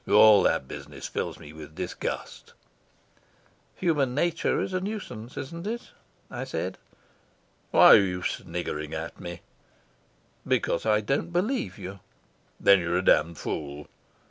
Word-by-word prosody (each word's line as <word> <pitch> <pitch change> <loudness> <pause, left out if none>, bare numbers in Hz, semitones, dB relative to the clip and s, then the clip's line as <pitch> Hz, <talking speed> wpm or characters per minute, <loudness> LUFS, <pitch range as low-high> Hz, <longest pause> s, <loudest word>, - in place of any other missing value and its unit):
"All 105 -1 +8
that 65 - +1
business - - -8
fills - - -3
me 75 - -12
with 75 -1 -11
disgust." - - -5 1.2
"Human 145 -8 +1
nature 170 +2 +1
is 190 - -2
a 185 - +1
nuisance, 135 - -6
isn't 170 +7 -6
it?" 235 +2 -5 0.4
I - - -4
said. - - -4 0.9
"Why - - +8
are - - +10
you 90 -2 0
sniggering 75 +1 -3
at 80 +1 -6
me?" 85 0 -7 1.1
"Because 85 - +1
I 105 -1 +4
don't 135 +9 -1
believe 175 - -1
you." 95 +2 -8 0.6
"Then 100 -1 +6
you're 85 0 0
a 95 - 0
damned 85 -1 +4
fool." 75 -1 -5
105 Hz, 135 wpm, -27 LUFS, -, 1.2 s, are